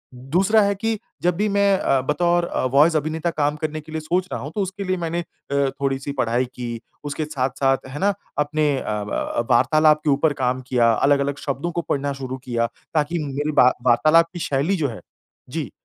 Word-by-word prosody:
दूसरा 185 - +2
है 200 0 +2
कि 225 +2 -1 0.2
जब 175 -1 +2
भी 210 +3 0
मैं 200 -1 +3
अ, 135 -1 +2
बतौर 170 +5 +1
अ, - - -2
वॉइस 155 +4 +5
अभिनेता 155 +2 -1
काम 150 0 +1
करने 155 0 -4
के 155 - -14
लिए 160 0 -3
सोच 180 +4 0
रहा - - -3
हूँ 145 +3 -6
तो 205 - 0
उसके 195 +1 -4
लिए 185 -1 -1
मैंने 170 0 -2
अ, - - -7 0.6
थोड़ी-सी 135 0 -1
पढ़ाई 120 +1 +1
की, 120 -2 -5 0.2
उसके 145 +1 -3
साथ-साथ 135 -1 0
है 145 - -6
ना 200 +1 +2 0.3
अपने 150 0 +1
अ, - - -4 0.2
ब 115 +2 -2
वार्तालाप 155 +4 +4
के 150 - +1
ऊपर 145 +2 +3
काम 130 +1 0
किया, 120 -2 +3
अलग-अलग 140 +3 +2
शब्दों 140 +5 -2
को 170 - -2
पढ़ना 140 0 0
शुरू 130 -1 -5
किया 115 -2 0 0.3
ताकि 160 +2 0
मेरी 145 +2 -2
वा 125 +1 +6 0.2
वार्तालाप 155 +8 +5
की 175 - -6
शैली 145 +7 0
जो 145 -3 0
है 110 - -8 0.5
जी, - - -4
150 Hz, 200 wpm, -22 LUFS, 135-170 Hz, 0.6 s, वा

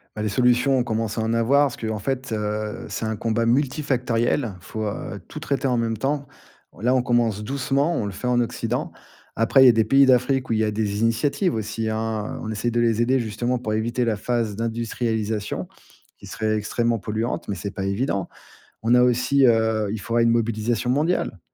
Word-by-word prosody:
Bah 105 - -4
les 105 - 0
solutions 125 +4 +3
on - - +2
commence 110 -1 -2
à - - 0
en 110 +1 0
avoir, 130 +5 +4
parce 135 - -3
qu'en 110 -2 -3
fait 130 +4 -3
heu, 105 0 -3
c'est - - -5
un 110 -1 -2
combat 115 +1 0
multifactoriel, 125 -3 0
faut 110 +4 -5
heu, 105 - -5
tout - - -8
traiter 140 -1 -1
en 125 - +1
même 115 -1 -1
temps. 140 +3 -1 0.5
On - - -19
là, 125 +5 +2
on 130 - +3
commence 120 -4 +1
doucement, 140 +5 0
on 115 - -1
le 100 - -4
fait 115 +6 -5
en 125 0 +2
Occident. 120 - -2 0.4
Après, 115 +4 +5
il - - +8
y - - +10
a - - +6
des 110 0 +3
pays 135 +5 +5
d'Afrique 130 +1 +2
où - - +1
il 110 - +1
y - - +2
a 105 - 0
des 105 -1 -2
initiatives 140 - +1
aussi 110 0 -3
hein, 110 -1 -3
on 110 - -5
essaye 110 +2 -1
de 120 - 0
les 115 -1 +2
aider 130 +3 +2
justement 120 +2 -2
pour 110 -3 -3
éviter 115 +3 0
la 115 -2 +1
phase 110 0 -1
d'industrialisation, 110 -1 -2 0.5
qui - - -13
serait 110 -1 -1
extrêmement 115 +2 0
polluante, 110 +2 -3
mais 100 - -1
c'est 100 +3 -5
pas 95 - -5
évident. 100 -1 -1 0.5
On 115 +2 +4
a 125 - +6
aussi 125 +3 +3
heu, 110 -2 +2
il 110 - -3
faudrait 115 +3 +1
une 115 - +4
mobilisation 115 0 0
mondiale. 145 - 0
115 Hz, 210 wpm, -23 LUFS, 110-125 Hz, 0.5 s, y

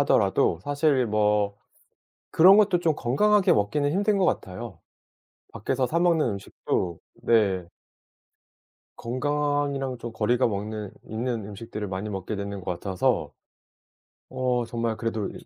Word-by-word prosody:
하더라도 85 - +2
사실 145 -2 +1
뭐 105 -1 +1 0.7
그런 185 +5 +7
것도 200 -4 +4
좀 160 -3 +2
건강하게 205 - +3
먹기는 115 +8 +1
힘든 200 +4 +1
것 190 - +2
같아요. 115 - -3 0.7
밖에서 130 +4 -1
사 165 - 0
먹는 170 -4 +3
음식도 95 -3 -3 0.2
네. 95 -6 +2 1.3
건강이랑 140 0 -1
좀 120 0 -7
거리가 120 +3 +1
먹는 105 -1 -4
있는 115 -1 -3
음식들을 105 0 -6
많이 95 +3 -4
먹게 100 +1 -4
되는 100 0 -5
것 90 - -3
같아서 90 +1 -1 1.0
어 125 -2 -1
정말 115 -1 -2
그래도 115 -3 -2
이 - - -12
115 Hz, 265 characters per minute, -25 LUFS, 105-145 Hz, 1.3 s, 그런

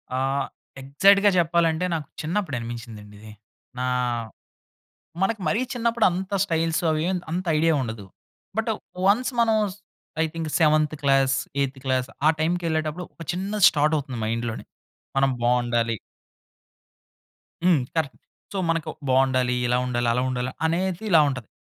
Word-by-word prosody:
ఆ! - - 0 0.6
ఎగ్జాక్ట్‌గా 200 +9 +5
చెప్పాలంటే, 170 0 +2
నాకు 155 -4 -3
చిన్నప్పుడు 160 -3 -2
అనిపించిందండి 115 -3 -8
ఇది. 110 0 -12 0.5
నా 125 - -1 1.4
మనకు 215 +2 +1
మరీ 215 +10 +1
చిన్నప్పుడు 235 -1 +2
అంత 190 +3 -3
స్టైల్సు 165 -2 0
అవేం 170 +4 0
అంత 180 +3 -2
ఐడియా 165 +1 +3
ఉండదు. 110 -4 -5 0.5
బట్, 225 0 0 0.4
వన్స్ 245 +7 +3
మనం 225 -2 +3 0.7
I - - +3
think 165 -2 -4
seventh 155 -1 +3
class, 135 -1 +3 0.3
ఐత్ 135 -1 -3
class 130 -1 0 0.2
ఆ 155 - +8
టైమ్‌కి 175 +2 0
వెళ్ళేటప్పుడు 160 +2 -1
ఒక - - -10
చిన్నది 195 +3 -1
స్టార్ట్ 150 +1 +2
అవుతుంది 130 -4 -6
మైండ్ 115 +2 -1
లోనే, 110 - -7 0.5
మనం 135 0 +3
బాగుండాలి. 120 -1 +1 1.7
హ్మ్. 175 -5 +5 0.2
కరెక్ట్. 155 -4 -1 0.4
సో, - - -3
మనకు 165 -2 0 0.2
బాగుండాలి, 130 -1 +3
ఇలా 125 +1 +2
ఉండాలి, 120 -1 -1
అలా 125 - +1
ఉండాలి 125 0 -2
అనేది 180 +4 -1
ఇలా 160 - +7
ఉంటది. 130 -5 -5
155 Hz, 135 wpm, -24 LUFS, 130-175 Hz, 1.7 s, ఆ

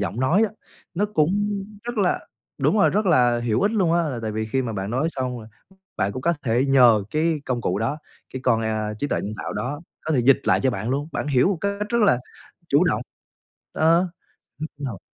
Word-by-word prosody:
giọng 105 +4 -2
nói 170 +12 +3
á, - - -16 0.4
nó 200 +4 +1
cũng 160 -5 +1 0.5
rất 240 -2 -4
là 185 -3 +2 0.4
đúng 215 - +2
rồi, - - +5
rất 210 0 0
là 120 -8 +4
hữu 115 -2 0
ích 205 - +3
luôn 185 -6 +2
á. 170 0 +3
Là 125 -4 -4
tại 110 -1 -3
vì 110 0 -2
khi 130 +4 0
mà 115 -2 -3
bạn 95 +1 -4
nói 135 +7 0
xong, 130 -3 -3 0.6
bạn 95 +1 0
cũng 130 - -6
có 170 +3 +2
thể 125 +2 +2
nhờ 125 -6 +5
cái 155 -1 0
công 125 -2 -1
cụ 100 -1 -1
đó, 115 +7 -1 0.4
cái 130 - -4
con, 115 -3 +2
a, 110 -1 -2
trí 145 +7 -3
tuệ - - -1
nhân 105 - -4
tạo - - -5
đó, 145 +5 -4 0.2
có 160 - -3
thể 130 - +3
dịch 135 +3 +5
lại - - +3
cho 130 - +3
bạn 105 +3 -3
luôn, 140 +3 -1
bạn - - -3
hiểu 130 +2 +3
một 195 -4 0
cách 200 +1 -2
rất 235 0 +1
là 125 -12 +4 0.5
chủ - - +4
động, - - +1 0.7
đó. 170 +3 +3 0.5
Lúc 155 +1 -5
đầu 130 -10 -5
135 Hz, 230 wpm, -23 LUFS, 115-170 Hz, 0.7 s, rồi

